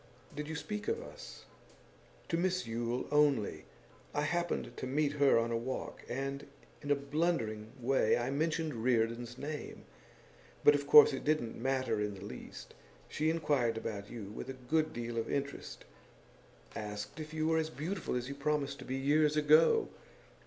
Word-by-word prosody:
'Did 150 Hz, +1 st, -4 dB
you 160 Hz, -, -4 dB
speak 210 Hz, +6 st, -5 dB
of 455 Hz, -, 0 dB
us?' -, -, -10 dB, 0.8 s
'To -, -, 0 dB
Miss 180 Hz, 0 st, 0 dB
Yule 115 Hz, +2 st, -2 dB
only. 145 Hz, -7 st, +2 dB, 0.5 s
I 145 Hz, -, +1 dB
happened 175 Hz, +2 st, -1 dB
to -, -, -4 dB
meet 145 Hz, +2 st, +1 dB
her 145 Hz, -3 st, +4 dB
on 115 Hz, 0 st, +1 dB
a -, -, +1 dB
walk, 125 Hz, +3 st, -4 dB
and 135 Hz, +2 st, -3 dB, 0.3 s
in 145 Hz, -, -7 dB
a 145 Hz, -, +5 dB
blundering 140 Hz, -7 st, -1 dB
way 125 Hz, -2 st, +3 dB
I 120 Hz, +2 st, -1 dB
mentioned 155 Hz, -4 st, -1 dB
Reardon's 120 Hz, 0 st, +1 dB
name. 150 Hz, +2 st, -6 dB, 0.8 s
But 145 Hz, -, +8 dB
of 145 Hz, -1 st, -1 dB
course 145 Hz, 0 st, +9 dB
it 135 Hz, -, -4 dB
didn't 150 Hz, -7 st, 0 dB
matter 130 Hz, -2 st, 0 dB
in 105 Hz, -1 st, -2 dB
the 95 Hz, +1 st, -9 dB
least. -, -, -9 dB, 0.4 s
She 155 Hz, +1 st, 0 dB
inquired 145 Hz, -8 st, +1 dB
about 100 Hz, -2 st, -5 dB
you 105 Hz, -4 st, -7 dB
with 120 Hz, -, -7 dB
a -, -, -3 dB
good 155 Hz, +5 st, 0 dB
deal 120 Hz, 0 st, -3 dB
of 115 Hz, -, -3 dB
interest 140 Hz, 0 st, -4 dB, 0.9 s
asked 105 Hz, +5 st, -5 dB
if 155 Hz, 0 st, -6 dB
you 155 Hz, 0 st, -1 dB
were 160 Hz, 0 st, +3 dB
as 160 Hz, 0 st, -1 dB
beautiful 160 Hz, +1 st, -3 dB
as 125 Hz, 0 st, -2 dB
you 140 Hz, -, -4 dB
promised 140 Hz, 0 st, -1 dB
to -, -, -9 dB
be 130 Hz, -, -3 dB
years 150 Hz, +3 st, +3 dB
ago. 155 Hz, +2 st, +5 dB
140 Hz, 170 wpm, -33 LUFS, 120-155 Hz, 0.9 s, course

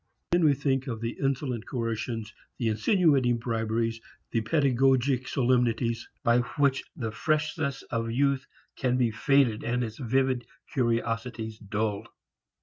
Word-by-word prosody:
Then 175 Hz, 0 st, +3 dB
we 145 Hz, -2 st, +5 dB
think 135 Hz, -1 st, 0 dB
of 115 Hz, -3 st, -3 dB
the 115 Hz, +1 st, -3 dB
insolent 135 Hz, -4 st, -1 dB
coercions, 115 Hz, -2 st, -3 dB, 0.2 s
the 115 Hz, -3 st, 0 dB
insinuating 130 Hz, -, +3 dB
briberies, 115 Hz, 0 st, -1 dB, 0.3 s
the 115 Hz, -, +1 dB
pedagogic 130 Hz, 0 st, +2 dB
solemnities 120 Hz, -2 st, +1 dB
by 115 Hz, +1 st, +4 dB, 0.2 s
which 140 Hz, -2 st, +2 dB
the 115 Hz, -4 st, -3 dB
freshness 150 Hz, +2 st, -1 dB
of 115 Hz, -1 st, -1 dB
youth 140 Hz, +2 st, +1 dB, 0.3 s
can 125 Hz, -1 st, +1 dB
be 120 Hz, -3 st, +2 dB
faded 120 Hz, -1 st, +2 dB
and 125 Hz, +1 st, 0 dB
its 110 Hz, +1 st, -6 dB
vivid 130 Hz, -1 st, +1 dB, 0.3 s
curiosities 115 Hz, -2 st, -1 dB
dulled. 105 Hz, 0 st, -2 dB
120 Hz, 130 wpm, -28 LUFS, 115-135 Hz, 0.3 s, we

